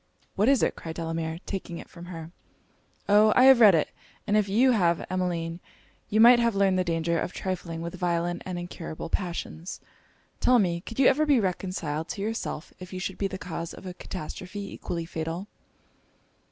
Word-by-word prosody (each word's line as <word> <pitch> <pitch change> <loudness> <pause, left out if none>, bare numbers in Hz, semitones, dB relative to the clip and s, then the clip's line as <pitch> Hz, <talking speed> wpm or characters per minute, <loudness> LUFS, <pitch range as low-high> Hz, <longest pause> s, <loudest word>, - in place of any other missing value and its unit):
'What 210 +6 +3
is 275 -2 +4
it?' - - +1
cried 160 -1 -7
Delamere, 165 -1 -3
taking 180 -3 -5
it - - -9
from 170 0 -11
her. 165 -2 -8 0.8
'O, 210 +1 +6
I 250 - +6
have 265 -2 +8
read 210 -6 +8
it 155 - +1 0.4
and 210 - +1
if 210 -2 +2
you 245 +6 +4
have, 175 -7 +2
Emmeline, 175 -2 -2 0.5
you 215 - +2
might 240 +2 +8
have 235 -2 +2
learned 195 -2 +3
the - - +2
danger 170 -1 0
of 180 - -3
trifling 175 -3 -4
with 170 - -5
violent 175 -1 -1
and 185 -1 -5
incurable 175 -2 -6
passions. 175 -1 -4 0.6
Tell 250 - +5
me 175 -6 +1
could 225 - -9
you 270 - +4
ever 305 +4 +4
be 280 -4 +5
reconciled 180 -5 -2
to 200 - -4
yourself 215 -7 -4
if 185 0 -10
you 185 - -5
should 190 0 -4
be 200 - +1
the 190 0 -6
cause 170 -2 -6
of - - -12
a 180 - -5
catastrophe 185 +3 -7
equally 170 -1 -4
fatal?' 165 +3 -4
180 Hz, 190 wpm, -27 LUFS, 170-205 Hz, 0.8 s, have